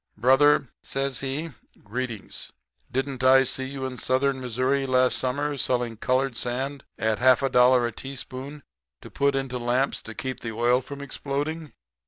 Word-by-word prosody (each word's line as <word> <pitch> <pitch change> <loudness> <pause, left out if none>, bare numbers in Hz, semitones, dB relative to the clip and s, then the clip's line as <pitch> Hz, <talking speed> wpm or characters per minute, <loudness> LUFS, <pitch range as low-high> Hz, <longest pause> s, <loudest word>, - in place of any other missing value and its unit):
"'Brother,' 135 +3 +4
says 135 -1 -3
he, 140 +5 -3 0.3
'greetings. 115 -1 -5 0.4
Didn't 130 0 -2
I 130 +1 +7
see 130 0 -2
you 135 0 -5
in 130 -2 -5
Southern 130 +2 +1
Missouri 130 +3 0
last 130 0 +3
summer 145 +3 -1
selling 120 -2 0
colored 130 +3 0
sand 130 +4 -3
at 110 -1 0
half 130 +1 +5
a 135 - +2
dollar 125 -1 +5
a 120 - -1
teaspoonful 135 +3 -8 0.4
to - - -11
put 140 0 +1
into 135 -2 -2
lamps 125 +3 0
to 110 - -9
keep 130 -1 -4
the 115 -1 -5
oil 120 +2 +3
from 140 +2 -8
exploding?' 145 +3 -4
130 Hz, 160 wpm, -25 LUFS, 125-140 Hz, 0.4 s, I